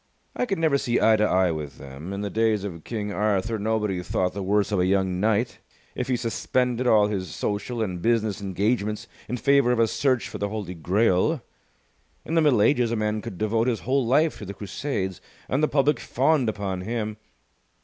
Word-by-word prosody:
I 250 Hz, -, -1 dB
could 195 Hz, -, -1 dB
never 155 Hz, -4 st, +2 dB
see 120 Hz, -3 st, +1 dB
eye 110 Hz, -1 st, +5 dB
to 105 Hz, -, +2 dB
eye 90 Hz, -2 st, +3 dB
with 75 Hz, -3 st, -5 dB
them. 70 Hz, +6 st, -9 dB
In 100 Hz, 0 st, -4 dB
the 100 Hz, -1 st, -3 dB
days 110 Hz, -2 st, +1 dB
of 85 Hz, -6 st, -6 dB
King 105 Hz, -3 st, -4 dB
Arthur 105 Hz, +2 st, 0 dB
nobody 105 Hz, -3 st, 0 dB
thought 90 Hz, 0 st, -1 dB
the 100 Hz, -, -4 dB
worse 100 Hz, +2 st, +1 dB
of 100 Hz, -, +1 dB
a 90 Hz, -, +2 dB
young 95 Hz, -1 st, +1 dB
knight 110 Hz, +4 st, +1 dB, 0.3 s
if -, -, -3 dB
he 130 Hz, -, +1 dB
suspended 125 Hz, +1 st, -1 dB
all 105 Hz, -3 st, +5 dB
his 100 Hz, -3 st, -3 dB
social 110 Hz, +3 st, -2 dB
and 90 Hz, -4 st, -4 dB
business 110 Hz, -3 st, +1 dB
engagements 105 Hz, +2 st, -1 dB, 0.2 s
in 125 Hz, -, -2 dB
favour 140 Hz, -1 st, +3 dB
of 125 Hz, -, +1 dB
a 115 Hz, 0 st, +4 dB
search 130 Hz, -3 st, +1 dB
for -, -, -7 dB
the 100 Hz, -, -1 dB
Holy 100 Hz, -4 st, -5 dB
Grail. 95 Hz, -, +1 dB, 0.8 s
In 160 Hz, -, -4 dB
the 165 Hz, -, +4 dB
Middle 130 Hz, -9 st, +4 dB
Ages 125 Hz, -3 st, +3 dB
a -, -, +1 dB
man 105 Hz, 0 st, -1 dB
could 95 Hz, -, -7 dB
devote 110 Hz, +3 st, +1 dB
his 120 Hz, -3 st, 0 dB
whole 135 Hz, +2 st, +1 dB
life 150 Hz, +6 st, +2 dB
to 105 Hz, -, -7 dB
the 100 Hz, -, -6 dB
Crusades, 100 Hz, -2 st, -4 dB, 0.3 s
and 135 Hz, -, 0 dB
the 155 Hz, -, +4 dB
public 145 Hz, -2 st, +2 dB
fawned 135 Hz, -1 st, +1 dB
upon 100 Hz, -3 st, -3 dB
him. 110 Hz, +1 st, -3 dB
110 Hz, 205 wpm, -25 LUFS, 100-125 Hz, 0.8 s, eye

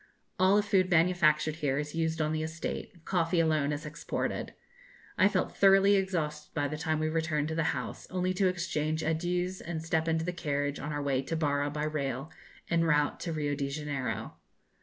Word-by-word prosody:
All 190 Hz, +2 st, +5 dB
the 205 Hz, -, +4 dB
food 190 Hz, -3 st, +2 dB
manufactured 160 Hz, -3 st, +3 dB
here 140 Hz, -4 st, 0 dB
is 150 Hz, 0 st, -3 dB
used 160 Hz, -1 st, 0 dB
on 155 Hz, 0 st, +1 dB
the 155 Hz, 0 st, -1 dB
estate; 160 Hz, +1 st, -5 dB
coffee 170 Hz, -2 st, +1 dB
alone 155 Hz, -3 st, +2 dB
is 150 Hz, +1 st, -4 dB
exported. 150 Hz, +1 st, -3 dB, 0.6 s
I -, -, +5 dB
felt -, -, -1 dB
thoroughly 195 Hz, +1 st, +6 dB
exhausted 165 Hz, -6 st, -2 dB
by 145 Hz, -2 st, +1 dB
the 155 Hz, -, -4 dB
time 155 Hz, +1 st, -1 dB
we 155 Hz, 0 st, 0 dB
returned 155 Hz, -1 st, 0 dB
to -, -, -2 dB
the 165 Hz, -1 st, +1 dB
house, -, -, -6 dB
only 185 Hz, 0 st, 0 dB
to 190 Hz, +1 st, +2 dB
exchange 160 Hz, -3 st, -1 dB
adieus 175 Hz, +3 st, -1 dB
and 160 Hz, -1 st, -4 dB
step 160 Hz, 0 st, 0 dB
into 160 Hz, 0 st, +1 dB
the 180 Hz, -, -2 dB
carriage 145 Hz, -4 st, -2 dB
on 145 Hz, +3 st, -4 dB
our 145 Hz, -1 st, -2 dB
way 135 Hz, -2 st, +1 dB
to 150 Hz, +5 st, -4 dB
Barra 145 Hz, -2 st, +1 dB
by 150 Hz, +1 st, -3 dB
rail 140 Hz, -1 st, -2 dB, 0.4 s
en 170 Hz, -1 st, +2 dB
route 150 Hz, -2 st, +2 dB
to 170 Hz, -, -3 dB
Rio 150 Hz, -2 st, -1 dB
de 140 Hz, -1 st, -2 dB
Janeiro. 140 Hz, -2 st, -4 dB
160 Hz, 195 wpm, -30 LUFS, 150-175 Hz, 0.6 s, thoroughly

